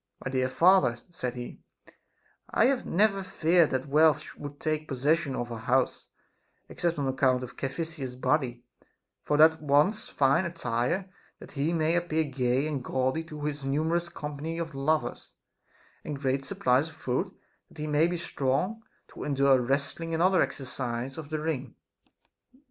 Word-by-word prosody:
My 130 Hz, -, -2 dB
dear 130 Hz, -1 st, +1 dB
father, 165 Hz, -3 st, +4 dB
said 125 Hz, -8 st, -4 dB
he, 120 Hz, 0 st, -8 dB, 0.9 s
I -, -, +3 dB
have 265 Hz, 0 st, +1 dB
never 195 Hz, +1 st, +2 dB
feared 170 Hz, -2 st, +3 dB
that 130 Hz, 0 st, -1 dB
wealth 150 Hz, +1 st, +3 dB
would 145 Hz, 0 st, -8 dB
take 155 Hz, -1 st, -2 dB
possession 140 Hz, +1 st, +1 dB
of 120 Hz, 0 st, -4 dB
our 115 Hz, -, -5 dB
house, 125 Hz, +2 st, 0 dB, 0.6 s
except 170 Hz, -2 st, -2 dB
on 140 Hz, -2 st, -1 dB
account 130 Hz, -1 st, +2 dB
of 125 Hz, 0 st, -8 dB
Caphi 135 Hz, +5 st, -3 dB
sias's 145 Hz, -6 st, -6 dB
body; 125 Hz, -3 st, 0 dB, 0.6 s
for 150 Hz, -, 0 dB
that 160 Hz, +1 st, +6 dB
wants 150 Hz, +7 st, +2 dB
fine 140 Hz, +6 st, +3 dB
attire, 165 Hz, +2 st, -1 dB, 0.3 s
that -, -, -13 dB
he 145 Hz, +3 st, -1 dB
may 165 Hz, 0 st, +1 dB
appear 170 Hz, -2 st, +1 dB
gay 130 Hz, -1 st, 0 dB
and 145 Hz, -4 st, -3 dB
gaudy 130 Hz, +6 st, 0 dB
to 150 Hz, -2 st, -9 dB
his 145 Hz, -1 st, -3 dB
numerous 160 Hz, +5 st, 0 dB
company 150 Hz, +2 st, -5 dB
of 165 Hz, -2 st, -4 dB
lovers, 150 Hz, +3 st, -1 dB, 0.7 s
and 145 Hz, -2 st, -5 dB
great 135 Hz, -1 st, 0 dB
supplies 130 Hz, +5 st, +2 dB
of 160 Hz, -, -12 dB
food, 125 Hz, -5 st, -1 dB, 0.4 s
that -, -, -19 dB
he 150 Hz, -, -4 dB
may 150 Hz, +2 st, +3 dB
be 175 Hz, 0 st, -2 dB
strong 170 Hz, +8 st, -1 dB, 0.3 s
to -, -, -8 dB
endure 140 Hz, -2 st, +3 dB
wrestling 140 Hz, +6 st, -1 dB
and 165 Hz, -, +1 dB
other 185 Hz, -1 st, +4 dB
exercises 130 Hz, 0 st, -3 dB
of 150 Hz, -2 st, -8 dB
the 155 Hz, -, -2 dB
ring. 150 Hz, -5 st, -3 dB
145 Hz, 160 wpm, -28 LUFS, 130-165 Hz, 0.9 s, that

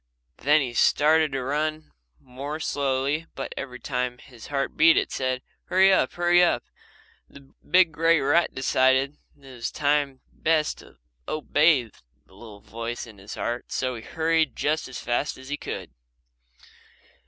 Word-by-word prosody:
Then 150 Hz, +2 st, +3 dB
he 125 Hz, -3 st, -3 dB
started 155 Hz, +5 st, +3 dB
to 135 Hz, -1 st, -2 dB
run 155 Hz, +3 st, -2 dB, 0.3 s
more 140 Hz, +4 st, -7 dB
slowly 140 Hz, +2 st, -1 dB
but 135 Hz, -, -5 dB
every 125 Hz, -2 st, -6 dB
time 125 Hz, -1 st, -3 dB
his 120 Hz, -2 st, -14 dB
heart 140 Hz, -1 st, -2 dB
beat 325 Hz, +3 st, +6 dB
it 400 Hz, -, 0 dB
said, 130 Hz, -1 st, -2 dB, 0.2 s
"Hurry 190 Hz, +1 st, +5 dB
up! -, -, +2 dB
Hurry 175 Hz, 0 st, +4 dB
up!" 175 Hz, -, +2 dB, 0.7 s
The 140 Hz, -1 st, -17 dB, 0.2 s
big 180 Hz, 0 st, +5 dB
grey 165 Hz, +1 st, +3 dB
rat 155 Hz, +5 st, +2 dB
decided 130 Hz, +2 st, +2 dB, 0.2 s
that 140 Hz, -2 st, -19 dB
it 130 Hz, -, -11 dB
was 140 Hz, +3 st, 0 dB, 0.2 s
best 155 Hz, -1 st, 0 dB
to -, -, -17 dB, 0.3 s
obey 150 Hz, -2 st, +3 dB, 0.4 s
the -, -, -24 dB
little 105 Hz, 0 st, -13 dB
voice 115 Hz, +2 st, -6 dB
in 110 Hz, -4 st, -14 dB
his 100 Hz, +2 st, -9 dB
heart 120 Hz, +1 st, -4 dB
so 130 Hz, -1 st, -1 dB
he 115 Hz, -, -7 dB
hurried 160 Hz, 0 st, 0 dB
just 155 Hz, +1 st, -1 dB
as 130 Hz, -, -8 dB
fast 120 Hz, +4 st, -2 dB
as 130 Hz, +1 st, -12 dB
he 145 Hz, -, -2 dB
could. -, -, -6 dB
140 Hz, 155 wpm, -25 LUFS, 130-155 Hz, 0.7 s, beat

